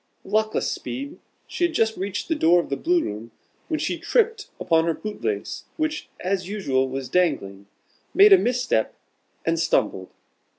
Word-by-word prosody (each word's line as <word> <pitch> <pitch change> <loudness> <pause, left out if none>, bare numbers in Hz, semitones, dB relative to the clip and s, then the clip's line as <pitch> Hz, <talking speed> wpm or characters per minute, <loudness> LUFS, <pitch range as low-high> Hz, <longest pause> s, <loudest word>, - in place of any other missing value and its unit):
Luckless 215 +2 0
speed! 280 +5 -6 0.3
She - - -4
had 345 -2 +1
just 220 -4 +2
reached 195 +1 -4
the 330 - +1
door 175 - +4
of 170 - -3
the 140 - 0
Blue 345 - +1
room, 110 +3 -6 0.4
when 315 -2 -1
she - - -2
tripped 450 -3 +1
upon 165 -1 +2
her 165 -1 0
boot 215 -1 -7
lace, 425 -1 -3
which, 310 -1 -2
as 185 0 -2
usual, 135 -11 0
was 135 0 -4
dangling, 100 - 0 0.4
made 405 +1 +7
a - - +9
misstep, 245 - 0 0.5
and 165 0 +1
stumbled. 105 - 0
200 Hz, 165 wpm, -24 LUFS, -, 0.5 s, a